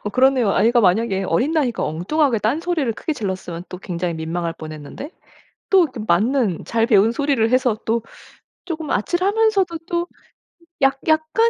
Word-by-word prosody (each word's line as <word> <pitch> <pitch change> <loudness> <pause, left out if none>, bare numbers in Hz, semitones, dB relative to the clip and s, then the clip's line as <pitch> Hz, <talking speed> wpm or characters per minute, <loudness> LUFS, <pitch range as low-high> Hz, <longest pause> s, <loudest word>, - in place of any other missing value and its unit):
어 210 - -2
그러네요. 255 -2 +3
아이가 235 +2 +3
만약에 195 0 +2
어린 245 - +1
나이니까 275 -8 0
엉뚱하게 230 - 0
딴소리를 295 +4 0
크게 305 +8 -3
질렀으면 185 - -5
또 180 - -7
굉장히 175 -2 -3
민망할 165 +1 -3
뻔했는데 155 - -9 0.6
또 375 -4 +6
그 255 -4 -9
맞는 215 - +1
잘 230 0 +1
배운 220 -1 +4
소리를 275 -5 +1
해서 255 -3 +2
또 230 +1 +1 0.6
쪼금 320 -4 -5
아찔하면서도 385 - +1
또 345 0 0 0.8
약 270 0 +3
약간 315 +9 +3
235 Hz, 350 characters per minute, -20 LUFS, 190-315 Hz, 0.8 s, 또